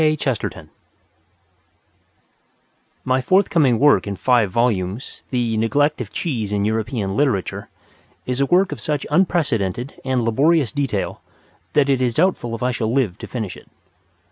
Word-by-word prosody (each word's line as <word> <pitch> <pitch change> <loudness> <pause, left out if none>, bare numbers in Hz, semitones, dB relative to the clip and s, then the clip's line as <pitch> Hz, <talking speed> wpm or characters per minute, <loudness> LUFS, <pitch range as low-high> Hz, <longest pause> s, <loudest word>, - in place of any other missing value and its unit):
Cheese 155 -6 +1 2.7
My 130 0 +2
forthcoming 160 - +3
work 145 -3 +4
in 100 - -3
five 120 0 +2
volumes, 105 0 -1
"The 120 -3 0
Neglect 145 +7 +1
of - - -7
Cheese 115 - -3
in 100 -1 0
European 110 -2 -2
Literature" 130 -9 -1 0.6
is 125 +1 -2
a 140 - +2
work 185 +4 +3
of - - -5
such 150 -3 -2
unprecedented 140 - 0
and 130 -2 0
laborious 140 +5 +2
detail 135 -9 -2 0.5
that 145 -2 +3
it 135 -2 +2
is 120 -3 0
doubtful 155 -9 +1
if 115 - -6
I 125 - +1
shall 110 -2 -2
live 115 -7 0
to - - -7
finish 110 -7 -5
it. - - -15
125 Hz, 145 wpm, -21 LUFS, 110-145 Hz, 2.7 s, work